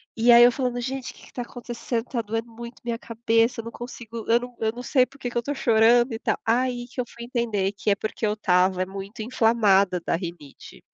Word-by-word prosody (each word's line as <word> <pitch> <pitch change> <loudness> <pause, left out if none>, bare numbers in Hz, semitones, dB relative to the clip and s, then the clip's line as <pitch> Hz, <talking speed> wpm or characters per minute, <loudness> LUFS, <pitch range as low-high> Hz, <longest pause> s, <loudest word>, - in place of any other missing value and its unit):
E 230 +2 +4
aí 235 0 +9
eu 245 - +7
falando: 250 -1 -2
"Gente, 260 +1 -4
o - - -21
que - - -17
que - - -14
está 250 - -6
acontecendo, 240 -1 -4
tá 240 -2 -2
doendo 225 +2 -4
muito 235 +1 -10
minha 235 0 -2
cabeça, 230 +1 +1
eu - - -17
não 230 - -6
consigo, 235 -2 -8
eu 230 +1 +5
não 245 0 -9
eu 220 0 +1
não 245 +1 -8
sei 255 -3 +3
por 270 - -18
que 245 - -3
que 240 - -3
eu - - +4
estou 280 +5 -3
chorando" 235 0 +4
e 225 - -4
tal. - - 0
Aí 245 +1 0
que 250 - -4
eu - - -5
fui 235 0 -10
entender 225 -6 -1
que 205 - -2
é 200 - +4
porque 215 +2 -3
eu 210 - +1
estava 185 -2 +2
muito 195 +3 -7
inflamada 210 -6 +3
da - - +1
rinite 170 -5 -9
230 Hz, 245 wpm, -24 LUFS, 215-245 Hz, -, aí